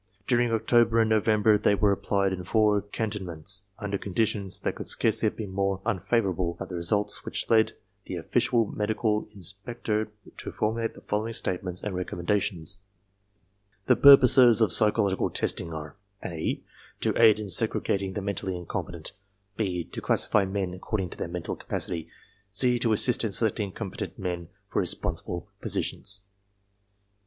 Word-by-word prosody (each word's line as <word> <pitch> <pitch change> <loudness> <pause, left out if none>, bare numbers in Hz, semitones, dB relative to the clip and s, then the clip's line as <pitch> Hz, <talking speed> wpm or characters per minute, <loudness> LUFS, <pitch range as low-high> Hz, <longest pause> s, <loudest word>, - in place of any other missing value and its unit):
During 120 -2 +2
October 115 0 +3
and 110 -1 +2
November 110 0 +3
they 100 - +3
were 100 0 +2
applied 100 0 0
in 90 -1 -5
four 105 +1 +2
cantonments 100 -3 -1
under 100 -1 -3
conditions 100 -1 0
which - - 0
could - - -8
scarcely 110 -1 +3
have - - -16
been 105 -4 -5
more 100 0 -1
un 95 - 0
favorable 95 -4 0
but - - -7
with 90 - -5
results 105 +5 +3
which - - -3
led 110 -1 +4 0.3
the - - -5
official 115 -2 +1
medical 105 +1 -1
in 100 - -12
spector 105 +3 -3 0.3
to - - -6
formulate 115 +1 -2
the - - -13
following 110 +2 -2
statements 90 0 -2
and 105 - -3
reconmienda 90 +2 -1
tions: 95 -1 -1 1.1
"The - - +4
purposes 130 -4 +7
of 110 -5 +3
psychological 105 -3 +2
testing 85 - -1
are 75 -2 -7 0.3
(a) 80 -3 -3 0.4
to - - +1
aid 110 -2 +6
in 105 - -5
segregating 95 +1 +1
the 100 - -4
mentally 95 -2 -2
incompetent, 85 -1 -5 0.4
(b) 95 -5 -2
to - - -8
classify 105 -2 +2
men 95 -1 -2
ac 90 - -9
cording 95 -3 -3
to - - -9
their - - -3
mental 85 0 -5
capacity, 85 -3 -4 0.4
(c) 125 +4 +1
to 115 -1 +1
assist 120 +3 +3
in 110 -3 -2
selecting 105 -2 0
com 100 -1 -6
petent - - -6
men 90 -3 -4 0.2
for - - -1
responsible 85 -1 -2
positions. 100 -1 0
100 Hz, 160 wpm, -27 LUFS, 95-110 Hz, 1.1 s, purposes